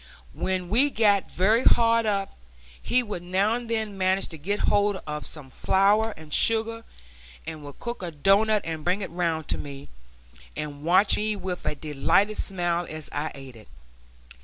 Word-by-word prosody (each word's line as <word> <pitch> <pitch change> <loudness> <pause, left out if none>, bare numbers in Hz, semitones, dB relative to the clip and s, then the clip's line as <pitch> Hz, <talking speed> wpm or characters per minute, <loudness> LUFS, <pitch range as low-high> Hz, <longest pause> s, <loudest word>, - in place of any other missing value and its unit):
When 185 -1 -2
we 255 +8 +4
got 205 -6 +2
very 215 +7 +2
hard 230 -1 +4
up, 200 -2 -1 0.5
he 250 0 +1
would 205 -6 -5
now 190 +5 +1
and 240 -1 -4
then 220 -3 -2
manage 190 +1 +1
to 160 - -8
get 200 +7 -2
hold 205 0 +2
of 150 0 -4
some 140 -4 -9
flour 210 +7 +2
and 155 -1 -9
sugar, 225 0 +1 0.6
and 155 -2 -7
would 145 -1 -10
cook 240 -2 -5
a 180 - -3
doughnut 200 +7 +3
and 160 -2 -4
bring 185 +4 0
it 185 - -6
round 165 -3 -1
to - - -1
me, 140 0 -8 0.7
and 150 -1 -6
watch 185 +5 +4
me 215 0 -1
with 185 -4 -5
a 150 - -1
delighted 155 +8 +1
smile 175 -2 -1
as 155 -1 -6
I 150 +2 -2
ate 135 -2 -11
it. 110 -2 -15
190 Hz, 175 wpm, -25 LUFS, 155-215 Hz, 0.7 s, we